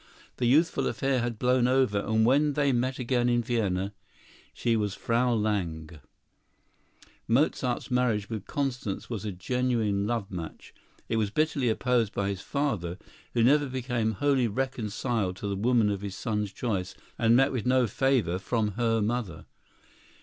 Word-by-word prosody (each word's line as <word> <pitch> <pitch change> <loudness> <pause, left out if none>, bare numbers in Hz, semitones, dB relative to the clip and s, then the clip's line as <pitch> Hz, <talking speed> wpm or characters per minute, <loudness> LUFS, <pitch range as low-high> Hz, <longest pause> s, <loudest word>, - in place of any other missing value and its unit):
The 125 - +1
youthful 155 +7 +3
affair 135 -2 0
had 120 -1 -2
blown 125 +1 +2
over; 130 -5 +2
and 110 +2 +1
when 145 +4 +3
they 140 -1 +2
met 125 +1 0
again 125 -1 +1
in 120 0 +2
Vienna 100 -4 -1 0.6
she 115 -1 0
was 105 -3 -1
Frau 120 +2 +1
Lange. 85 -8 -2 1.3
Mozart's 125 0 +1
marriage 120 -5 +1
with 110 -4 -6
Constance 125 -8 -3
was 110 -3 -4
a 105 - -2
genuine 110 0 0
love 115 -4 -2
match. 85 -4 -7 0.3
It 115 - 0
was 105 -2 +1
bitterly 145 0 +1
opposed 115 -1 +1
by 100 0 0
his 95 -2 -4
father, 105 - -2 0.4
who 115 - +3
never 145 +4 +4
became 120 -3 -1
wholly 135 +1 +2
reconciled 110 -4 -2
to 100 - -5
the 100 - -1
woman 115 0 +2
of 100 -1 -3
his 100 -2 -5
son's 105 -3 -2
choice, 95 -4 -3 0.2
and 115 0 +4
met 135 +2 +4
with 125 -3 -2
no 130 0 +4
favor 115 -7 +1
from 110 +2 0
her 115 +1 0
mother. 110 -6 -3
115 Hz, 155 wpm, -28 LUFS, 100-125 Hz, 1.3 s, never